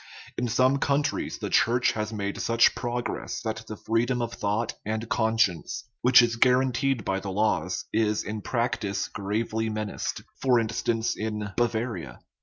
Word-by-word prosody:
In 125 - -1
some 130 +4 +3
countries 140 +1 0
the - - -5
Church 120 +1 +3
has 110 0 -3
made 100 -2 -3
such 115 0 +4
progress 120 0 -3
that 110 -1 -4
the 110 - -6
freedom 120 +3 0
of 120 -1 -2
thought 110 +1 -1
and 110 +2 -3
conscience, 110 - +1 0.2
which 125 0 +7
is 120 0 0
guaranteed 130 -1 +2
by 95 0 0
the 100 - -6
laws, 95 -4 0
is 105 -1 +1
in 105 0 -5
practice 105 -5 -1
gravely 110 +2 -2
menaced 110 -1 -3 0.2
(for 125 -3 +4
instance, 115 0 0
in 105 -1 -3
Bavaria). 115 - -2
110 Hz, 150 wpm, -27 LUFS, 105-120 Hz, 0.2 s, which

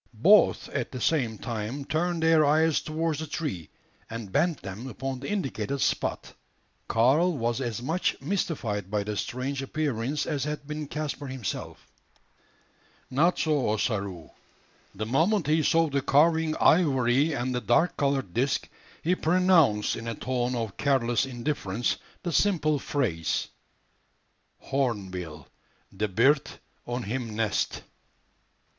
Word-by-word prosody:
Both 210 +3 +5
at 130 -4 -3
the 130 - -5
same 120 -6 +1
time 120 +4 -4
turned 170 +2 -1
their 160 -1 +5
eyes 155 +2 +3
towards 160 0 -2
the 160 - -4
tree, 140 - -4 0.4
and 115 -4 -6
bent 165 - +1
them 100 +6 -6
upon 130 +2 -4
the 140 - -6
indicated 140 - -2
spot. - - -1 0.5
Karl 145 +9 +3
was 120 +1 -1
as 120 -2 -3
much 165 +7 0
mystified 115 - -2
by 105 0 0
the 105 +1 -4
strange 130 +5 -3
appearance 140 -1 -2
as 145 -4 -2
had 150 0 -4
been 150 0 -5
Caspar 145 -1 -4
himself. 130 -5 -5 1.3
Not 160 +7 +3
so 150 -7 +1
Ossaroo. 100 -6 -2 0.6
The 110 +3 -3
moment 165 - +2
he 155 +2 +3
saw 165 +2 +3
the 140 -2 0
carving 160 +3 +3
ivory 140 -2 +3
and 125 -1 -2
the 125 - -1
dark 120 +10 +2
coloured 135 -9 0
disc, 135 +3 0 0.4
he 175 - +2
pronounced, 165 - +3
in 115 - -7
a 115 - -3
tone 125 +1 -1
of 115 -4 -4
careless 130 -3 +1
indifference, 120 -4 -2 0.3
the 175 - -2
simple 155 -5 +2
phrase, 100 - -1 1.1
"Hornbill 95 - -3 0.5
de 105 +2 0
bird 135 +9 +3 0.4
on 120 0 -3
him 115 0 -4
nest." 110 -1 -1
135 Hz, 135 wpm, -27 LUFS, 115-155 Hz, 1.3 s, Both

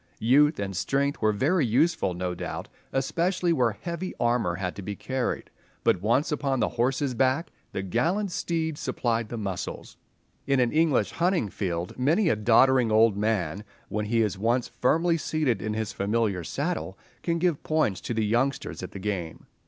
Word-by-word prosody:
Youth 145 +7 +4
and 100 -1 -3
strength 140 +9 0
were 110 -1 +4
very 145 - +2
useful, 130 - +2
no 90 0 -2
doubt, 85 - -5 0.2
especially 170 +6 +1
where 120 -7 +2
heavy 170 +2 -4
armour 120 -7 +1
had 90 -1 -3
to - - -5
be 100 +2 -5
carried, 130 +2 -3 0.3
but 90 - +2
once 120 +10 +2
on 140 -3 0
the 110 - +2
horse's 130 +3 0
back 130 +6 +1 0.2
the 95 - -3
gallant 180 - 0
steed 160 -3 -2
supplied 115 -8 -1
the 120 - -5
muscles. 100 -4 -5 0.5
In 135 -1 +3
an 120 -2 +2
English 155 -9 +2
hunting 170 - +1
field 90 +1 -4
many 165 +9 +3
a - - +3
doddering 120 +2 +4
old 110 -1 +5
man, 100 -4 -1 0.3
when 105 0 -2
he 115 +1 +2
is 105 -2 -2
once 120 +3 +1
firmly 165 +6 +2
seated 155 -6 0
in 105 0 -2
his 110 -1 -3
familiar 100 -2 0
saddle, 145 - -3 0.2
can 170 -1 0
give 170 -3 +1
points 155 -12 0
to 120 - -4
the 110 -1 +1
youngsters 125 +5 0
at 90 - -7
the - - -6
game. 95 -5 -4
120 Hz, 175 wpm, -26 LUFS, 105-155 Hz, 0.5 s, old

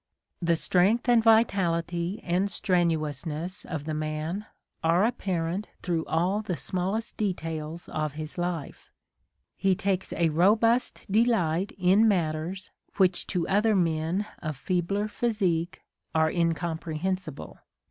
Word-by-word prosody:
The 170 -1 +3
strength 195 +9 +2
and 240 -2 +5
vitality 190 -4 +2
and 180 +3 +1
strenuousness 170 0 -1
of 160 -4 -4
the 155 - -3
man 155 +6 -3 0.4
are 170 +5 +4
apparent 185 -4 -2 0.2
through 170 -3 -1
all 180 +6 +1
the 195 -5 -3
smallest 190 +5 -2
details 165 -5 -3
of 155 -2 -2
his 155 0 -6
life: 175 -4 -4 0.7
he 190 -1 +2
takes 195 0 -1
a 170 -1 +2
robust 215 +9 +3
delight 200 -5 +2
in 195 +4 +4
matters 175 -1 -1 0.3
which 185 -2 +2
to 180 -3 -1
other 210 +2 +3
men 165 +2 +1
of 155 -4 -4
feebler 185 +6 -1
physique 190 -7 -1 0.3
are 160 0 +3
incomprehensible. 165 - -2
175 Hz, 115 wpm, -27 LUFS, 160-200 Hz, 0.7 s, and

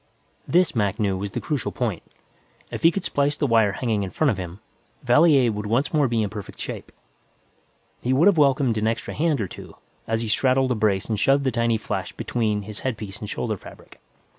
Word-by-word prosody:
This, 175 -2 +3
Mac 105 0 0
knew, 100 -3 +1
was 100 +2 -4
the - - -4
crucial 150 -4 -2
point. 110 -9 -2 0.7
If - - -5
he 165 - +7
could 185 +2 -3
splice 145 +1 0
the - - 0
wire 115 -5 +3
hanging 110 -4 -1
in 95 - -3
front 150 +7 +1
of 100 - -4
him, 90 +1 -7 0.4
Valier 130 -1 +5
would 105 0 -4
once 125 +9 0
more 150 -3 +3
be 115 -2 0
in 105 - -2
perfect 105 -3 -8
shape. - - -7 1.1
He 125 - -1
would 135 +6 +4
have 200 -5 +5
welcomed 135 -5 +3
an 110 - 0
extra 115 0 -2
hand 155 -3 +1
or 100 - -1
two, - - -11 0.3
as 115 0 0
he 115 - -3
straddled 130 +3 +2
a - - +2
brace 105 -3 +1
and 110 -3 -2
shoved 135 +5 +3
the 130 - +1
tiny 115 -1 +1
flash 110 - -4
between 105 -4 -1
his 105 +1 -7
headpiece 110 -5 -5
and 105 - -6
shoulder 110 -2 -2
fabric. - - -14
115 Hz, 215 wpm, -24 LUFS, 105-135 Hz, 1.1 s, he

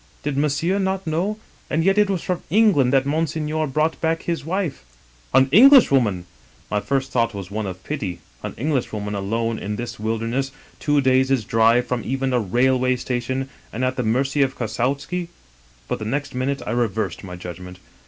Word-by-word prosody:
Did 145 -1 -2
Monsieur 150 +7 +1
not 190 0 -1
know? 175 +7 -1 0.3
And 165 - +1
yet 195 +3 +3
it 205 -1 +4
was 190 -4 -1
from 180 -1 -2
England 180 - +4
that 135 -1 +3
Monseigneur 155 +1 -1
brought 155 +4 0
back 165 0 0
his 170 -3 -2
wife.' 170 - -2 0.2
" - - -31
* - - -31
An 130 - +6
Englishwoman! 140 - +6
' - - -30
" - - -30
My 105 - +2
first 135 +4 -1
thought 115 -2 +1
was 100 -1 -7
one 105 0 -3
of 95 0 -7
pity; 95 - -4 0.2
an - - -6
Englishwoman 115 -6 -2
alone 115 +3 -1
in 105 +1 -4
this 120 +1 -6
wilderness 115 +5 -1 0.2
— - - -28
^two 145 0 +2
days' 130 -1 +3
drive 115 +3 +3
from 125 -1 -2
even 135 0 -1
a 125 - +3
rail 125 +5 +2
way 130 0 +2
station 125 +2 -2
— - - -29
and 125 +3 -1
at 130 0 -1
the 125 - -1
mercy 135 +5 +1
of 135 -1 +1
Kossowskil 135 +10 -2 0.6
But - - -2
the 110 - -5
next 145 +6 -2
minute 135 +2 -2
I - - -3
reversed 115 -3 -1
my 90 -2 -7
judgment. 90 +1 -8
130 Hz, 200 wpm, -22 LUFS, 110-155 Hz, 0.6 s, An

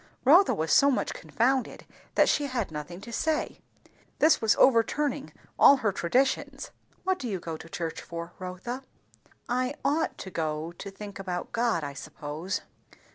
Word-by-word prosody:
Rotha 345 +9 +6
was 160 +1 0
so 280 - +6
much 265 - 0
confounded 260 +3 -1 0.3
that - - +5
she 290 - +2
had 240 -9 -2
nothing 155 +4 -7
to 235 +3 -9
say. 315 +3 -1 0.6
This 315 +2 +4
was 225 -1 +4
overturning 270 +4 +2 0.3
all 280 - +8
her 220 -5 +1
traditions. 255 +10 0 0.3
"What 375 0 0
do 250 - -4
you 195 -5 -2
go 165 -1 -5
to 165 - -11
church 165 0 -4
for, 170 0 -7
Rotha?" 185 +8 -5 0.7
"I 255 +3 0
ought 315 +3 +1
to 190 - -8
go 155 0 -2
to 185 +3 -8
think 200 0 -9
about 180 -2 -4
God, 230 -8 +1
I 140 -1 -4
suppose." 150 +5 -5
205 Hz, 160 wpm, -28 LUFS, 170-265 Hz, 0.7 s, all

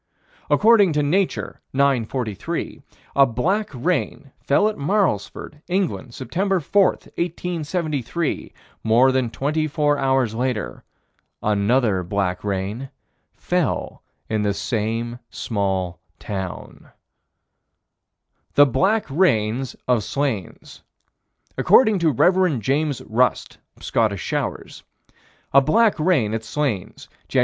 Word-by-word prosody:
According 210 -5 +5
to 150 0 +1
Nature, 185 +6 -1
9 135 -4 +2
43, 110 -5 -4 0.3
a 140 -1 +6
black 185 - 0
rain 140 0 -2
fell 205 +10 +2
at 215 - -2
Marlsford, 150 - -1
England, 175 -9 -2
Sept. 180 - -1
4, 200 +6 +4
1873; 170 -3 -3 0.3
more 120 +4 +4
than 130 -2 0
twenty 155 +6 -1
four 145 -1 +1
hours 130 -4 +1
later 125 -2 -3 0.6
another 105 0 +2
black 90 0 -2
rain 105 +6 -3 0.5
fell - - -2 0.3
in 110 -1 -1
the 100 -1 0
same 115 +2 -2
small 95 -5 -2 0.2
town. 95 -3 -7 1.7
The 145 - +8
black 195 - +1
rains 130 - +1
of 125 -4 +2
Slains: 130 - -4 0.8
According 220 -6 +5
to 165 -2 +3
Rev. 180 +1 +3
James 140 +5 -1
Rust 125 +3 0 0.2
(Scottish 105 -6 0
Showers): - - -4 0.7
A 140 - +7
black 215 +9 +3
rain 150 - +2
at 115 0 -2
Slains, 115 -6 -3 0.2
Jan. - - +1
135 Hz, 105 wpm, -22 LUFS, 110-165 Hz, 1.7 s, The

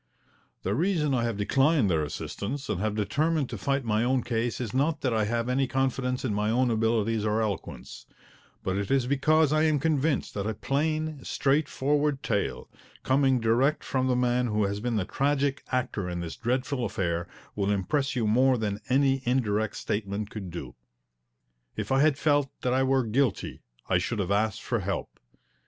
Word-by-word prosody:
The 95 - 0
reason 155 - +1
I 120 -2 +1
have 115 -3 -2
declined 135 +4 +3
their 80 -4 +2
assistance 105 - -5
and 100 -3 -1
have 105 0 -1
determined 150 +7 0
to 115 - -4
fight 140 +1 0
my 110 0 +1
own 125 0 +1
case 115 0 -1
is 115 -5 -4
not 145 +4 +1
that 130 -3 0
I 110 -1 +2
have 115 +2 -1
any 130 +1 +1
confidence 130 0 -1
in 115 - 0
my 105 +1 0
own 125 +2 +2
abilities 110 -1 +1
or 105 +1 +1
eloquence, 80 - -4 0.6
but 95 0 -1
it 100 - -3
is 135 -2 +2
because 150 +3 +3
I 155 - +3
am 155 -2 +3
convinced 150 0 0
that 100 0 -3
a 110 - -2
plain, 155 +4 -1
straightforward 145 0 +1
tale, 105 -3 -1 0.4
coming 130 -1 +3
direct 120 +6 +2
from 130 -1 0
the 125 - +2
man 125 0 +1
who 105 -1 +1
has 100 +1 -1
been 120 +1 -2
the 100 -4 0
tragic 140 +2 0
actor 120 -7 -1
in 90 0 -3
this 85 -1 -5
dreadful 125 +2 -1
affair, 85 -6 -2 0.3
will 100 -1 0
impress 135 +8 0
you 120 -3 0
more 125 +4 +4
than 105 -2 -2
any 135 0 +3
indirect 110 -4 0
statement 105 0 -3
could 100 -4 -6
do. 75 -7 -7 1.0
If - - -4
I 135 +1 +4
had 150 -2 +4
felt 145 -2 +2
that 125 - +1
I 130 - +2
were 130 -1 +2
guilty 120 +1 0 0.3
I 90 - +3
should 110 +6 -2
have 100 -2 -1
asked 105 0 0
for - - -1
help. - - -4
125 Hz, 185 wpm, -27 LUFS, 105-135 Hz, 1.0 s, more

